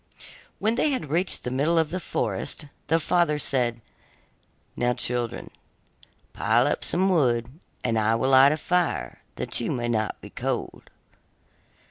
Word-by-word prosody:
When 220 Hz, +2 st, +1 dB
they 300 Hz, -, +2 dB
had 255 Hz, -, -3 dB
reached 175 Hz, +4 st, +1 dB
the 125 Hz, -, -3 dB
middle 150 Hz, +6 st, +1 dB
of 160 Hz, -2 st, +2 dB
the 185 Hz, -, -2 dB
forest, 160 Hz, -, -3 dB, 0.2 s
the 165 Hz, +2 st, +3 dB
father 170 Hz, -2 st, +2 dB
said: 120 Hz, -5 st, -1 dB, 0.9 s
'Now, 125 Hz, 0 st, +1 dB
children, 120 Hz, -1 st, -2 dB, 0.8 s
pile -, -, +2 dB
up -, -, 0 dB
some 185 Hz, +2 st, +1 dB
wood, 130 Hz, -6 st, +1 dB, 0.2 s
and 115 Hz, -2 st, +1 dB
I 110 Hz, +1 st, +2 dB
will 130 Hz, +4 st, +1 dB
light 135 Hz, +1 st, +7 dB
a 155 Hz, -, 0 dB
fire 180 Hz, +2 st, -1 dB
that -, -, -1 dB
you -, -, -2 dB
may 120 Hz, -1 st, -2 dB
not 110 Hz, -2 st, -1 dB
be -, -, -12 dB
cold. -, -, -4 dB
135 Hz, 150 wpm, -25 LUFS, 120-170 Hz, 0.9 s, light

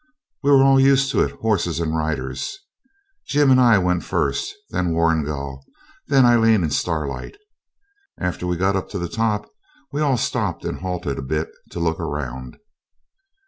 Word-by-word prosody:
We 140 Hz, -, +1 dB
were 135 Hz, -1 st, +7 dB
all 135 Hz, 0 st, +5 dB
used 135 Hz, 0 st, +4 dB
to -, -, +2 dB
it, -, -, +2 dB
horses 95 Hz, -7 st, 0 dB
and 80 Hz, -1 st, -1 dB
riders. 70 Hz, -5 st, -3 dB, 0.7 s
Jim 145 Hz, -1 st, +3 dB
and 130 Hz, 0 st, +6 dB
I 120 Hz, -4 st, +6 dB
went 90 Hz, -2 st, +1 dB
first, 400 Hz, 0 st, -1 dB, 0.2 s
then 85 Hz, -2 st, 0 dB
Warrigal, 75 Hz, -5 st, -1 dB, 0.4 s
then 135 Hz, -2 st, +5 dB
Aileen 115 Hz, -4 st, +4 dB
and 75 Hz, -3 st, -1 dB
Starlight. 80 Hz, -, -3 dB, 0.8 s
After 90 Hz, 0 st, -3 dB
we 90 Hz, -1 st, -1 dB
got 95 Hz, +3 st, +1 dB
up 95 Hz, -, -3 dB
to 100 Hz, -, -5 dB
the 85 Hz, -1 st, -3 dB
top 105 Hz, 0 st, -1 dB, 0.4 s
we 145 Hz, -, -2 dB
all 140 Hz, -4 st, +2 dB
stopped -, -, -2 dB
and -, -, -3 dB
halted 90 Hz, -6 st, -3 dB
a -, -, -3 dB
bit 75 Hz, +4 st, -2 dB, 0.2 s
to -, -, -7 dB
look 80 Hz, -1 st, 0 dB
round. 65 Hz, -6 st, -5 dB
90 Hz, 165 wpm, -21 LUFS, 80-120 Hz, 0.8 s, were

